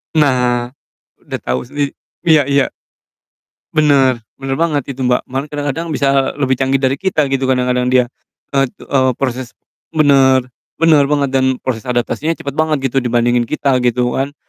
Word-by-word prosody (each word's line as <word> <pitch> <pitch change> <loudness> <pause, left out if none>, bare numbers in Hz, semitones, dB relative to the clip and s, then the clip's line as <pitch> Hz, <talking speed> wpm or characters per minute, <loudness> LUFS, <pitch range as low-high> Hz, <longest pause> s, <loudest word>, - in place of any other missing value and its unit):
Nah, 125 -5 +2 0.6
udah - - -5
tau 65 +1 -2
sendiri 145 +2 -3 0.3
iya 155 -3 +6
iya. 140 -1 +2 1.0
Bener 140 -5 +3 0.2
bener 135 +1 -4
banget 155 -4 +1
itu, 135 - -11
Mbak, 125 -1 +1
malah 135 +3 -2
kadang-kadang 145 +2 -3
bisa 135 -1 +1
lebih 130 -3 0
canggih 135 0 +1
dari 135 +2 +1
kita 190 -6 +1
gitu 135 -1 0
kadang-kadang 125 -1 +1
dia. 125 0 +4 0.5
Et 135 -1 +2
eee, 130 +1 0
proses 130 -2 -4 0.4
benar 135 -4 +4 0.3
benar 155 -4 +4
banget 140 -2 0
dan 130 -1 +2
proses 125 -1 -3
adaptasinya 125 +6 -1
cepet 140 - -6
banget, 150 -3 0
gitu, 135 - +2
dibandingin 120 -1 +1
kita, 135 -2 +1
gitu 125 0 +1
kan. 140 +2 -3
135 Hz, 155 wpm, -16 LUFS, 125-145 Hz, 1.0 s, iya